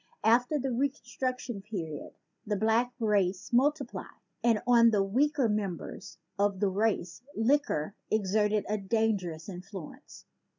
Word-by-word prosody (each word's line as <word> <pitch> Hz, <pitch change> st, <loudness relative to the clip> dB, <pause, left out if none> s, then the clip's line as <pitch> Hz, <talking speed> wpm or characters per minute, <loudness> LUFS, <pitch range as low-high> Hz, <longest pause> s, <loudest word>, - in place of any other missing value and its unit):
After 245 Hz, +6 st, +4 dB
the 270 Hz, -1 st, -2 dB
Reconstruction 255 Hz, -3 st, -2 dB
period 175 Hz, -8 st, -6 dB, 0.3 s
the 210 Hz, -1 st, -1 dB
black 225 Hz, +4 st, +2 dB
race 200 Hz, -2 st, +1 dB
multiplied; 280 Hz, +3 st, +1 dB, 0.4 s
and 230 Hz, -3 st, +4 dB
on 235 Hz, -1 st, +6 dB
the 205 Hz, -3 st, +2 dB
weaker 270 Hz, +6 st, +2 dB
members 205 Hz, -5 st, -4 dB, 0.2 s
of 200 Hz, -1 st, +2 dB
the 200 Hz, -, +2 dB
race 200 Hz, -1 st, -1 dB
liquor 225 Hz, -, +1 dB, 0.2 s
everted 210 Hz, 0 st, +2 dB
a 215 Hz, 0 st, -1 dB
dangerous 195 Hz, -6 st, -1 dB
influence. 185 Hz, -3 st, -9 dB
215 Hz, 120 wpm, -30 LUFS, 195-245 Hz, 0.4 s, on